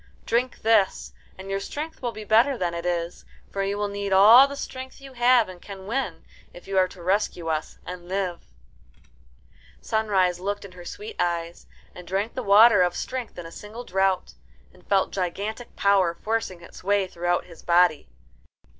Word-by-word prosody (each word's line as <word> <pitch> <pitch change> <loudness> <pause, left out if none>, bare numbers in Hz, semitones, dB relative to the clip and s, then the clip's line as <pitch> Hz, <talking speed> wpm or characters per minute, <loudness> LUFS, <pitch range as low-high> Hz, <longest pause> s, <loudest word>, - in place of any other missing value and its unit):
Drink 245 +2 -1
this, 220 -3 +2 0.2
and 190 +1 -8
your 195 - 0
strength 305 +10 -6
will 240 -2 -2
be 215 -1 -9
greater 235 +6 +4
than 175 -4 -1
it 170 +1 -4
is; 170 0 -3 0.3
for 195 - -2
you 200 +1 -1
will 205 0 -1
need 200 0 -4
all 220 +8 +8
the 280 - -7
strength 260 -1 -7
you 270 -1 -12
have 245 -1 +4
and 180 -1 -11
can 195 -2 -10
win, 215 -7 -3 0.3
if 175 - -13
you 195 - -4
are 185 - +4
to 180 -1 -13
rescue 185 -3 0
us 155 -1 -3
and 180 -1 -8
live." 185 -2 -2 1.4
Sunrise 195 -5 +1
looked 200 +2 -3
in 195 - -11
her 180 -1 -12
sweet 425 - -8
eyes, 170 -1 -2 0.3
and 180 -1 -12
drank 200 +4 -2
the 255 - -3
water 210 -1 +7
of 175 -1 +2
strength 255 -6 -5
in 175 - -7
a 165 - -9
single 215 +6 -9
draught, 190 -3 0 0.4
and 180 - -22
felt 195 -1 +2
gigantic 200 +6 -4
power 195 -4 +3
forcing 210 -3 -3
its - - -13
way 200 0 +2
throughout 175 -1 -1
his 170 -2 -14
body. 175 -3 +3
195 Hz, 180 wpm, -25 LUFS, 180-225 Hz, 1.4 s, all